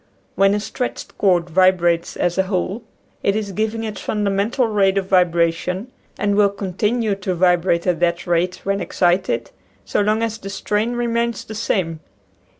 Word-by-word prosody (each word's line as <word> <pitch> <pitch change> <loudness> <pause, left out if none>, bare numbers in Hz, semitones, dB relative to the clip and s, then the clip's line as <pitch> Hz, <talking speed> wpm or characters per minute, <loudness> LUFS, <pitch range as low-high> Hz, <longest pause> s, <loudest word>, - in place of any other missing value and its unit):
When 195 +1 +3
a - - 0
stretched 220 +5 -5
cord 180 -4 +3
vibrates 175 -1 +2
as 175 +1 0
a 190 0 +1
whole, 190 +3 -1 0.4
it 200 - +1
is 210 -2 -2
giving 220 +3 -2
its 215 -2 -5
fun 210 -1 -2
damental 215 +4 0
rate 195 -1 +3
of 195 - 0
vibration, 180 +3 +1 0.3
and 205 0 +1
will 205 -1 +5
continue 205 +3 -1
to 190 -2 -3
vibrate 175 -1 +2
at 180 -3 +1
that 170 0 0
rate 175 +1 0
when 195 0 -1
excited 175 -10 0 0.3
so - - 0
long 215 +2 +1
as 225 -1 -2
the 195 - -7
strain 210 +4 -1
remains 235 -1 -1
the 220 - -8
same. 185 -7 -1
195 Hz, 165 wpm, -20 LUFS, 180-215 Hz, 0.4 s, will